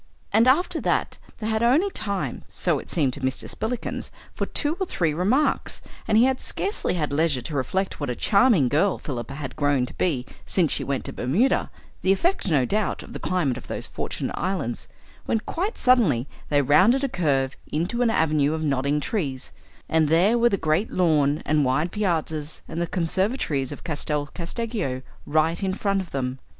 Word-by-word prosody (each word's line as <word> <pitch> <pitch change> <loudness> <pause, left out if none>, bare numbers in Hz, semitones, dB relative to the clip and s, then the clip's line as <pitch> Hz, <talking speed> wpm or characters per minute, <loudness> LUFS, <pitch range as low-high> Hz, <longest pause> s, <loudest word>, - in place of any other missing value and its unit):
And 230 +3 +5
after 295 +8 +3
that - - 0 0.2
they 215 - -6
had 220 0 +1
only 290 +12 +3
time, 200 - -3
so - - +1
it - - -11
seemed 140 -7 +1
to 145 - -7
Mr. 130 0 -2
Spillikins, 235 +2 -3 0.2
for - - -3
two 295 +1 0
or 380 - -1
three 165 - 0
remarks, 210 - +1 0.3
and 215 - +3
he 230 - +7
had 260 0 +2
scarcely 400 - -1
had 150 -4 -1
leisure 150 -3 +1
to 150 - -5
reflect 185 +8 -1
what 145 -3 -3
a 125 - -1
charming 200 - +4
girl 160 +9 +2
Philippa 130 -1 -5
had 140 -2 -6
grown 145 -3 +2
to - - -10
be 135 -9 0 0.2
since 170 -6 +1
she - - 0
went 140 -2 -2
to - - -5
Bermuda 185 - +1 0.3
the 185 - +3
effect, 335 - +1
no 140 -6 +3
doubt, 210 - -1
of - - -12
the - - -5
climate 155 -9 0
of 130 - -10
those - - -4
fortunate - - -4
islands 175 -11 -3 0.4
when - - +2
quite 385 - -3
suddenly 190 - +3 0.2
they 145 -1 +3
rounded 190 - +4
a - - +2
curve 140 - 0 0.2
into 175 +10 -1
an 240 - +3
avenue 155 -6 +2
of 160 - -3
nodding 140 0 +1
trees, 140 - -3 0.4
and 160 -1 +3
there 175 +9 +4
were 240 0 +4
the 195 - +1
great 160 +5 +1
lawn 155 -4 +2
and 150 0 +2
wide 135 +6 +1
piazzas 160 -6 -2
and 165 +1 -4
the 170 - 0
conservatories 175 - -1
of - - -8
Castel 150 -2 -1
Casteggio 180 - -3 0.2
right 160 +4 +2
in 190 -1 -1
front 200 -1 0
of 180 - -9
them. 130 -1 -3
165 Hz, 190 wpm, -24 LUFS, 145-215 Hz, 0.4 s, he